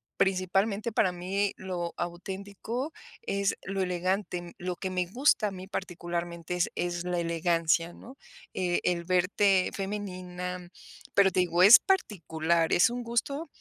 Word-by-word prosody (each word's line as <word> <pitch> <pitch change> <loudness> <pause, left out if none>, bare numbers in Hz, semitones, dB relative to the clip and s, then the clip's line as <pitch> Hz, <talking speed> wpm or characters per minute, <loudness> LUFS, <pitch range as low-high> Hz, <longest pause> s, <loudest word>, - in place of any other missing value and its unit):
Principalmente, 195 +4 +1
para 190 -4 +3
mí 190 +3 -1
lo 180 -2 -4
auténtico, 200 - -5 0.3
es 200 - 0
lo 195 0 -2
elegante. 180 -1 -2
Lo 180 0 -3
que 190 - -3
me 180 -1 -1
gusta, 240 +1 +2
a - - -3
mí 185 0 -8
particularmente, 175 -2 -4
es 180 - +1
es 175 0 -2
la 180 -1 -1
elegancia, 170 0 +1
¿no? 250 +9 -13 0.4
Eh, 180 -1 0
el 175 -1 +1
verte 185 +2 +2
femenina, 180 -3 -5 0.4
pero 195 -1 +5
te 185 - +2
digo, 175 0 +3
es 205 +6 +11
particular, 170 - 0
es 175 - +5
un 245 +1 -4
gusto 275 +7 -2
185 Hz, 140 wpm, -29 LUFS, 175-200 Hz, 0.4 s, es